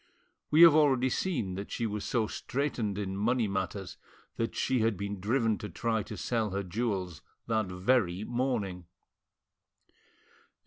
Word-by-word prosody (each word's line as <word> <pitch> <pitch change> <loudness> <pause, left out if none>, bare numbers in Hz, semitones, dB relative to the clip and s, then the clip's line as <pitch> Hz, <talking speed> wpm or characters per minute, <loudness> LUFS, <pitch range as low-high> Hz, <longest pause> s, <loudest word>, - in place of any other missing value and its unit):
We 155 +3 +7
have 165 -3 +10
already 135 -4 +4
seen 120 - -1
that 100 +2 -6
she 115 - -2
was 105 -1 -3
so 115 -3 0
straitened 120 -4 -2
in 95 -2 -3
money 115 +3 +1
matters 95 -1 -3 0.4
that 115 - -2
she 130 -1 +1
had 110 -3 +1
been 100 0 -4
driven 110 +2 +1
to 105 - -6
try 115 -2 -1
to - - -8
sell 115 -3 -1
her 100 +1 -2
jewels 95 -4 -3 0.2
that 110 -3 0
very, 90 0 +1
morning. 115 -8 -2
110 Hz, 145 wpm, -30 LUFS, 95-125 Hz, 0.4 s, have